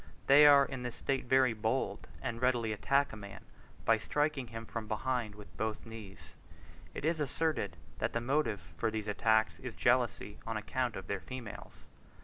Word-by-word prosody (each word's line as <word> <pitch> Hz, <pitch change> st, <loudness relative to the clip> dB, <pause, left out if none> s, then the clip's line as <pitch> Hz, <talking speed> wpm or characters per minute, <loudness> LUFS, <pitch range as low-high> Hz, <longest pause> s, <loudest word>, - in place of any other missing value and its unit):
They 145 Hz, +2 st, +8 dB
are 140 Hz, -1 st, +8 dB
in 130 Hz, -2 st, -6 dB
this 120 Hz, -1 st, -4 dB
state 135 Hz, -2 st, -1 dB
very 130 Hz, -1 st, +4 dB
bold, 110 Hz, -1 st, -1 dB, 0.2 s
and 115 Hz, 0 st, -3 dB
readily 120 Hz, -3 st, +2 dB
attack 140 Hz, +5 st, +1 dB
a -, -, -5 dB
man 100 Hz, -2 st, -10 dB, 0.4 s
by -, -, +4 dB
striking 145 Hz, -3 st, 0 dB
him 115 Hz, 0 st, -7 dB
from 115 Hz, -1 st, -5 dB
behind 115 Hz, -1 st, -1 dB
with 100 Hz, -3 st, -13 dB
both 110 Hz, -1 st, -2 dB
knees. 110 Hz, -4 st, -10 dB, 0.6 s
It -, -, -4 dB
is 160 Hz, 0 st, +1 dB
asserted 150 Hz, -, -1 dB, 0.2 s
that 110 Hz, -, -1 dB
the 115 Hz, -, +1 dB
motive 115 Hz, -, -1 dB
for -, -, +1 dB
these 110 Hz, -1 st, -4 dB
attacks 110 Hz, +2 st, +2 dB
is -, -, -7 dB
jealousy 105 Hz, -, +1 dB
on 115 Hz, -1 st, -3 dB
account 115 Hz, +3 st, -1 dB
of 95 Hz, -, -6 dB
their 100 Hz, -1 st, -2 dB
females. 120 Hz, +4 st, -9 dB
115 Hz, 175 wpm, -33 LUFS, 105-130 Hz, 0.6 s, They